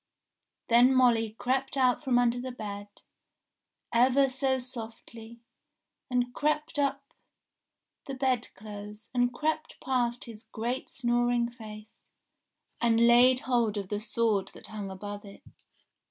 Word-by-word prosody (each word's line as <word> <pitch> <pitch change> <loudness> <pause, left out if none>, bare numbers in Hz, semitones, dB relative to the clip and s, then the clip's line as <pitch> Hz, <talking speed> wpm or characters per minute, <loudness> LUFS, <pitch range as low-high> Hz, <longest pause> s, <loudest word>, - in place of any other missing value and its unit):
Then 245 +3 +5
Molly 230 -4 +3
crept 265 +2 -1
out 255 +1 +2
from 255 -4 +2
under 245 0 +2
the 255 0 -5
bed, 205 -4 -6 1.1
ever 260 +3 +4
so 265 0 0
softly, 230 -2 -8 0.7
and 245 -1 0
crept 300 +2 -1
up 275 0 -1 0.9
the 275 - -4
bed 255 -3 0
clothes, 210 +1 -10
and 245 -1 +2
crept 310 +4 -2
past 245 -2 -1
his 225 0 -11
great 240 +3 -4
snoring 240 -1 +1
face, 215 -2 -12 0.7
and 235 0 +4
laid 250 +2 +6
hold 235 -6 +1
of 195 -2 -4
the 205 - -2
sword 215 -2 0
that - - -10
hung 210 -2 -6
above 205 +2 -7
it. 200 -1 -13
240 Hz, 125 wpm, -29 LUFS, 220-255 Hz, 1.1 s, laid